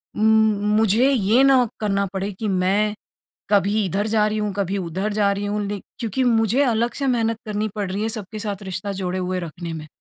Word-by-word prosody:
उम, 215 - +1 0.5
मुझे 220 +5 +4
ये 235 0 +3
ना 265 -3 +5
करना 200 -2 0
पड़े 195 +1 -2
कि 220 - -2
मैं 195 +2 +1 0.6
कभी 205 +1 +2
इधर 195 +3 -1
जा 215 -1 +2
रही 215 0 -2
हूँ, 210 -1 -1
कभी 200 0 -1
उधर 190 +3 -3
जा 205 -1 +2
रही 200 +1 -2
हूँ 205 +1 -1
लेक 205 -1 -5 0.2
क्योंकि 235 +1 -1
मुझे 230 +2 +3
अलग 235 -2 +1
से 275 - +1
मेहनत 230 -3 +1
करनी 210 0 -2
पड़ 200 -3 -3
रही 200 +2 -2
है 220 - 0
सबके 210 +2 -8
साथ 205 -2 -4
रिश्ता 190 +1 -4
जोड़े 185 0 -2
हुए 185 0 -2
रखने 170 0 -6
में। 155 -1 -7
205 Hz, 210 wpm, -22 LUFS, 195-220 Hz, 0.6 s, ना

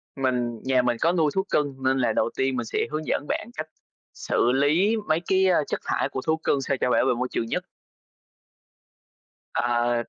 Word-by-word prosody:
mình 125 -4 -1
nhà 130 -1 +3
mình 120 -1 0
có 165 - +4
nuôi 160 -4 +2
thú 190 - +2
cưng 145 -2 0
nên 130 0 +2
là 120 -4 +1
đầu - - +1
tiên 135 0 +1
mình 120 -2 -2
sẽ - - -1
hướng 155 +1 -3
dẫn - - -1
bạn 225 - -2
cách 155 0 -4 0.5
xử 120 - +1
lý 155 - +3
mấy 155 +1 +2
cái, 190 0 +3
ơ, 175 -5 +3
chất - - -2
thải - - 0
của 130 - -4
thú 160 0 +2
cưng 145 -3 0
sao 135 0 -1
cho - - +2
bảo 125 - +3
vệ 130 - +3
môi 125 +2 -2
trường 115 - -1
nhất. - - -2 1.9
Ờ, 120 0 +1
135 Hz, 210 wpm, -25 LUFS, 125-155 Hz, 1.9 s, có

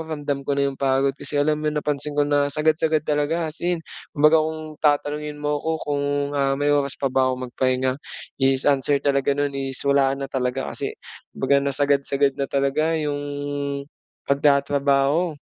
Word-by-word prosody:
ramdam 145 -2 -3
ko - - 0
na 140 0 +1
'yong 135 - -6
pagod 135 0 +2
kasi 150 - -5
alam 150 +1 +1
mo - - +2
napansin 150 -1 -2
ko 145 0 +3
na 145 -1 +3
sagad-sagad 155 +1 +2
talaga 150 +3 0
as 155 - -12
in. 175 -1 0 0.3
Kumbaga 150 +2 +5
kung 155 0 -3
tatanungin 150 0 0
mo 150 0 0
ko 160 +1 -2
kung, 145 -1 -1 0.3
ah, 135 -1 +2
may 145 - +2
oras 140 -2 +1
pa 135 - +1
ba 130 -1 +2
ko 130 - -5
magpahinga, 130 +1 0 0.4
is 135 0 +2
answer 140 0 +2
talaga 140 0 +2
no'n, 145 0 0
is 135 -1 -4
wala 140 -1 +3
na 135 0 -5
talaga 125 -1 -2
kasi - - -4 0.4
baga 135 +1 +2
na 140 0 -1
sagad-sagad 140 0 +1
na 140 - -1
talaga 140 +4 +1
'yong 150 -2 -1 1.1
pagtatrabaho. 140 +3 +2
145 Hz, 170 wpm, -23 LUFS, 140-150 Hz, 1.1 s, Kumbaga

